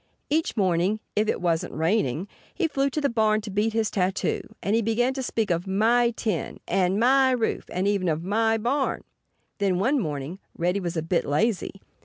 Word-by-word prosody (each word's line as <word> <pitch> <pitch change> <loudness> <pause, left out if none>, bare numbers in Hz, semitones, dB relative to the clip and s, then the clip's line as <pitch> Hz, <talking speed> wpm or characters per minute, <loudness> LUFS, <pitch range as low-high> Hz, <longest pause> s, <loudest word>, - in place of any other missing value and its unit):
Each 315 -4 0
morning 185 +2 +1 0.2
(if 215 +1 +2
it - - -1
wasn't 170 -2 -1
raining) 165 - 0 0.3
he 350 - +1
flew 275 -2 0
to 290 - -2
the 285 - +2
barn 220 -3 +2
to 210 -1 -7
beat 210 +3 0
his 225 -1 0
tattoo. 185 -1 0 0.2
And 200 +3 +1
he 230 - +3
began 235 +4 +1
to 265 - -4
speak 225 -5 -1
of 170 +2 -1
"My 230 +5 +3
tin," 210 -8 -2
and 190 +1 +1
"My 265 +3 +5
roof"—and 220 -6 -1
even 200 -3 +1
of 160 +1 -1
"My 225 +4 +2
barn!" 260 +5 -1 0.6
Then, 195 -3 +1
one 260 +10 +2
morning, 150 - -4 0.2
Reddy 180 +3 +1
was 175 -2 -3
a 160 - -1
bit 170 +1 +1
lazy. 195 +4 -1
210 Hz, 190 wpm, -25 LUFS, 180-230 Hz, 0.6 s, My